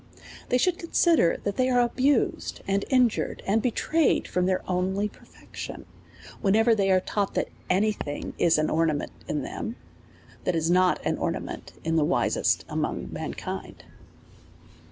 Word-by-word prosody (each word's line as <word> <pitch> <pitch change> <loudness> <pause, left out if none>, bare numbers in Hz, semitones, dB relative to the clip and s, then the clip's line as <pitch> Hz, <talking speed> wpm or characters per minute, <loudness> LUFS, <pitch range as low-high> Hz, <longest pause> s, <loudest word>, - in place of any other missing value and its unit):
They 250 - +3
should 350 +7 +1
consider 335 - +3
that 200 -1 -2
they 255 0 +2
are 250 -1 +3
abused 255 +2 +1
and 195 +1 +1
in 255 -2 +5
jured, 225 - -4
and 215 +3 +2
betrayed 300 +6 +1
from 180 0 0
their 185 -1 -1
only 190 +3 0
perfection, - - -10 0.6
when 195 0 +3
ever 225 +1 +5
they 200 -3 +1
are 185 -1 +5
taught, 200 +1 -2
that - - 0 0.2
any 200 +4 +3
thing 145 -8 -5
is 165 -2 +4
an 155 0 +1
ornament 155 -2 0 0.2
in - - -2
them, - - -5 0.7
that 180 - 0
is 165 +1 +1
not 185 0 +4
an - - 0
ornament - - -4
in 165 0 0
the 155 - +4
wisest - - +1
amongst - - -3
mankind. - - -6
195 Hz, 155 wpm, -26 LUFS, 180-245 Hz, 0.7 s, in